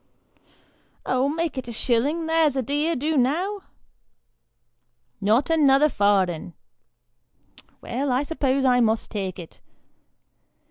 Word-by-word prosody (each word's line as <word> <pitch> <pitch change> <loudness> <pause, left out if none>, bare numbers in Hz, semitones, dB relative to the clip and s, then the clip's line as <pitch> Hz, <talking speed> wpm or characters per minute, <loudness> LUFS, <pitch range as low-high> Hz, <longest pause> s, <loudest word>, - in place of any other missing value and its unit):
" - - -38
Oh, 260 +2 +1
make 320 -2 -2
it 255 - -8
a - - -5
shillin'; 260 +8 0
there's 320 -3 +2
a 265 - -1
dear 295 +6 -1
do 305 +5 -1
now? 335 +11 0 0.5
" - - -52
" - - -49
Not 225 +10 +2
another 295 -2 +4
farden." 190 - 0 0.6
" - - -29
Well, 260 +3 -3
I 255 +3 +1
suppose 275 -3 -1
I 250 -1 +4
must 225 -1 0
take 195 -4 -4
it." 170 -3 -12
265 Hz, 135 wpm, -23 LUFS, 230-305 Hz, 0.6 s, another